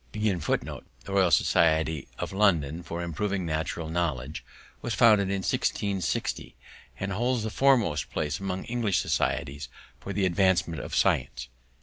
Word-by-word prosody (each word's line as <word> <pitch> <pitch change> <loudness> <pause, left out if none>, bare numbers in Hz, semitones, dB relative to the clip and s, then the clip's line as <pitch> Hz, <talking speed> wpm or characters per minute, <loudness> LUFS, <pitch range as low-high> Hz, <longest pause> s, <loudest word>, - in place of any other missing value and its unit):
The 105 -7 -1 0.3
Royal 95 -2 +3
Society 80 -3 +2
of - - -4
London 85 -6 +2
for 85 0 -5
Improving 95 +3 -2
Natural 80 +1 -2
Knowledge 75 -4 -2 0.4
was 120 - -2
founded 105 -5 +5
in 100 -1 -1
1660 100 -2 -1 0.4
and 100 0 -3
holds 120 +3 0
the 110 - -3
foremost 115 - +2
place 75 -1 -2
among 95 -1 -3
English 115 -6 0
societies 70 -4 -1 0.3
for 100 - -7
the 100 0 0
advancement 90 -4 +2
of - - -5
science. 60 -1 +1
90 Hz, 130 wpm, -27 LUFS, 80-100 Hz, 0.4 s, founded